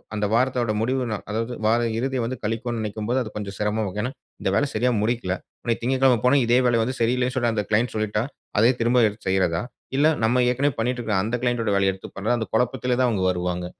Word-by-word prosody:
அந்த 105 - 0
வாரத்தோட 120 -2 +1
முடிவு 130 +3 0
நா 105 - -1
அதாவது 115 +3 -2
வார 115 +2 +3 0.2
இறுதிய 130 +1 -1
வந்து 130 +2 -4
கழிக்கோன்னு 115 +2 -2
நெனைக்கும்போது, 110 +4 -2
அது 110 - -7
கொஞ்சம் 100 -2 -5
சிரமமா 105 +1 0 0.2
ஏன்னா, 125 +4 -2 0.3
இந்த - - 0
வேலய 145 - +2
சரியா 125 +3 +2
முடிக்கல. 110 -4 0 0.3
அன்னக்கி 115 -1 -1
"திங்கட்கிழம 130 -1 +3
போனா 140 +3 +5
இதே 120 +2 +4
வேலய 115 -2 +3
வந்து 130 +2 -3
சரியில்லேன்னு 125 +2 +1
சொல்லி, 120 -2 +2
அந்த 105 -2 -1
க்ளைண்ட் 115 +3 +1
சொல்லிட்டா, 110 0 0 0.4
அதே 115 +4 +6
திரும்ப 120 0 +4
எடுத்து 105 -1 -7
செய்றதா? 90 -2 +1 0.3
இல்ல 145 +2 +5 0.2
நம்ம 125 +3 +3
ஏற்கனவே 135 +2 +1
பண்ணிட்டு 125 +2 0
இருக்கிற 105 -4 0
அந்த 115 +3 -1
கிளைண்ட் 120 -1 +1
டோட 105 -2 0
வேலைய 95 -1 +2
எடுத்து 95 - -11
பண்றதா?" 110 +5 0
அந்த 110 - -3
குழப்பத்திலே 125 +1 +1
தான் 125 -1 +3
அவுங்க 95 -5 0
வருவாங்க. 90 0 -2
115 Hz, 215 wpm, -24 LUFS, 105-125 Hz, 0.4 s, அதே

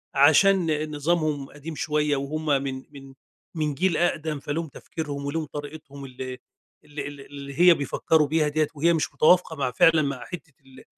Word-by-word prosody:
عشان 155 +2 +4
نظامهم 150 -2 0
قديم 150 +2 -9
شوية، 150 -1 0
وهُم 145 +3 -4 0.2
من 130 -1 -5
من 135 -2 -12 0.4
من 150 -2 -1
جيل 180 +1 +1
أقدم 155 -3 0
فليهم 155 +3 -3
تفكيرهم 145 -1 -6
وليهم 155 +3 -2
طريقتهم 145 -1 -9
اللي 130 0 -7 0.5
اللي 145 -1 -6
اللي 140 -1 -10
اللي 140 0 -9
هي 175 0 +8
بيفكروا 150 +1 +1
بيها 155 +1 +1
دِيّة، 150 0 +1
وهي 165 +4 +3
مش 160 -3 -1
متوافقة 175 0 +4
مع 135 -4 -1
فعلًا 160 +6 +5
مع 140 -3 -2
حتة 155 -5 -9
ال 130 0 -16
150 Hz, 165 wpm, -25 LUFS, 140-160 Hz, 0.5 s, هي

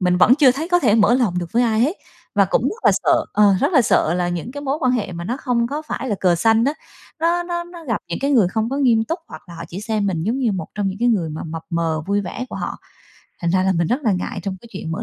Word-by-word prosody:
mình 180 -1 +2
vẫn 215 +7 +6
chưa 275 -3 +5
thấy 315 +6 -4
có 355 - +4
thể 240 -11 +3
mở 225 +2 +4
lòng 225 -9 +1
được 175 -2 -5
với 240 +2 +3
ai 225 -2 +1
hết 300 +10 +1 0.4
và 200 -1 +5
cũng 195 - 0
rất 420 - -3
là - - +7
sợ, - - +3
ờ, 205 -2 +5
rất 290 +6 +1
là 270 -6 +5
sợ 170 -6 +2
là 175 0 0
những 175 +8 -4
cái 285 - -6
mối 275 +2 -1
quan 255 -2 +2
hệ 210 -7 -2
mà 170 0 -6
nó 245 +7 -2
không 245 -4 0
có 290 +5 -4
phải 280 -3 -5
là - - +2
cờ 180 -2 +3
xanh 225 +4 +3
á, 280 - +2 0.5
nó 340 +2 +2
nó 345 0 -3
nó 345 -1 -12
gặp 230 -7 -2
những 170 - -3
cái 275 +2 0
người 220 -9 +4
không 220 +4 -1
có 275 - -2
nghiêm 235 -5 +3
túc, 330 +8 -3
hoặc - - -10
là 170 - -10
họ 165 0 -7
chỉ 185 +4 -7
xem 210 -2 -1
mình 170 -5 -1
giống 235 +5 -1
như 235 -5 +1
một 180 -5 -4
trong 205 -2 -1
những 190 +1 -5
cái 240 +2 +2
người 180 -9 +1
mà 155 - -6
mập 160 0 -6
mờ, 165 -2 -1
vui 200 0 +2
vẻ 205 +5 -5
của - - -7
họ, - - -4 0.6
thành 170 - 0
ra 185 +1 +2
là 190 - +2
mình 170 -2 0
rất 255 +5 -1
là 220 -6 +2
ngại 185 +1 -3
trong 190 -1 -4
cái 235 - -15
chuyện 165 -4 -5
mở - - -4
220 Hz, 310 wpm, -20 LUFS, 180-265 Hz, 0.6 s, là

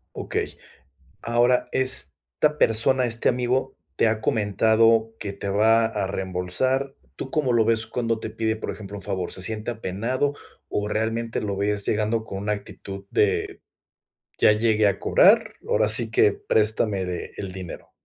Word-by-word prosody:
Okey. - - -3 0.6
Ahora, 120 +2 +2
esta 130 - 0
persona, 125 +3 +3
este 115 -1 +2
amigo, 125 +2 -1 0.2
¿te 115 - +3
ha 110 0 +1
comentado 110 +1 +2
que 100 -2 -4
te 100 0 -7
va 110 +3 +4
a 105 -3 -2
reembolsar? 95 +10 -2 0.2
¿Tú 135 - -6
cómo 135 -4 0
lo 115 -2 +3
ves 115 -1 +2
cuando 115 -2 -2
te 110 - -6
pide, 110 0 -1
por 110 - -5
ejemplo, 100 -1 -8
un - - -8
favor, 95 -3 -3
se 95 - -6
siente 110 +3 -4
apenado 120 +6 -2 0.4
o 105 0 -2
realmente 115 +2 -1
lo 105 -3 -3
ves 100 +1 -1
llegando 110 +1 0
con 100 -3 -6
una 105 +1 -1
actitud 100 -1 -8
de: 100 -2 0 0.8
"Ya - - +6
llegué 110 -1 +2
a 100 - +1
cobrar, - - +4
ahora 105 - +2
sí 110 +1 +2
que 105 -2 +4
préstame 105 -2 0 0.3
el 100 -2 -5
dinero"? 90 -2 -9
110 Hz, 155 wpm, -24 LUFS, 100-115 Hz, 0.8 s, Ya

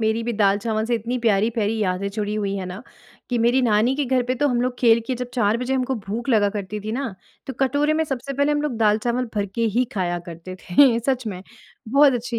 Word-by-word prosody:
मेरी 220 +1 +1
भी 235 +1 -2
दाल-चावल 215 +1 +1
से 240 - +1
इतनी 235 +2 -2
प्यारी-प्यारी 220 0 +1
यादें 190 -1 -1
जुड़ी 210 0 -2
हुई 200 -2 -2
हैं 185 - -4
ना, 185 +5 -7 0.5
कि 245 - +1
मेरी 240 +3 +3
नानी 225 +2 +3
के 290 - 0
घर 255 -1 +1
पे 250 +1 -1
तो 290 +3 +1
हम 245 -2 +1
लोग 250 0 -1
खेल 230 -2 +5
के 260 - -1
जब 250 0 -6
4 215 -2 +2
बजे 250 +2 -1
हमको 260 0 0
भूख 225 +3 -5
लगा 215 -4 +4
करती 205 +1 -5
थी 215 +2 -5
ना, 255 -4 -3 0.3
तो 265 - -4
कटोरे 285 +3 +2
में 320 +1 +1
सबसे 275 -2 -4
पहले 285 +2 +1
हम 295 0 0
लोग 290 -6 -2
दाल-चावल 230 +3 +1
भर 205 -1 0
के 230 - -1
ही 250 - +4
खाया 175 -3 -1
करते 170 +2 -8
थे, 230 +7 +4
सच 255 0 -1
में। 185 -4 -5 0.5
बहुत 275 +3 +5
अच्छी 240 0 -3
230 Hz, 235 wpm, -22 LUFS, 210-255 Hz, 0.5 s, खेल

